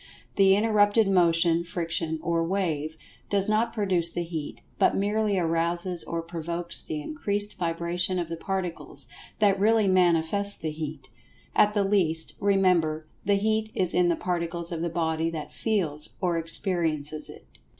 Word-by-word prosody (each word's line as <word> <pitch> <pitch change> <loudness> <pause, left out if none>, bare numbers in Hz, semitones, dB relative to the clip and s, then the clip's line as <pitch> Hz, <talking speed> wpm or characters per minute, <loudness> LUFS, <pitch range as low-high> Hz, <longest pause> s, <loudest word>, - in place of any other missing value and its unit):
The 195 -1 +5
interrupted 210 0 +3
motion, 170 -2 +3
friction, 170 -2 -2
or 170 -1 +1
"wave" 160 -4 -2 0.3
does 200 0 +2
not 220 +2 +1
produce 190 -6 +1
the 175 - -2
Heat, 165 -3 -6 0.2
but - - +4
merely 205 0 +1
arouses 170 +1 -1
or 165 0 -3
provokes 170 +1 -3
the 155 - -5
increased 205 - -3
vibration 175 +2 0
of 175 -2 -2
the 165 - -4
Particles, 185 0 -4 0.3
that 200 -2 +3
really 215 0 +3
manifest 185 +2 +2
the 155 - -1
Heat. 150 -5 -7 0.4
At 210 +1 +4
the 205 - +3
last, 175 -5 +1
remember, 180 -6 +2 0.2
the 200 +1 +3
Heat 215 +2 0
is 180 -2 +2
in 180 -1 +3
the 170 - +2
Particles 170 -1 -2
of 165 -1 -3
the 170 - -1
body 160 -1 -1
that 160 -2 -6
"feels" 165 -10 -2
or 180 -3 0
experiences 160 -3 0
it. - - -12
175 Hz, 150 wpm, -26 LUFS, 165-200 Hz, 0.4 s, The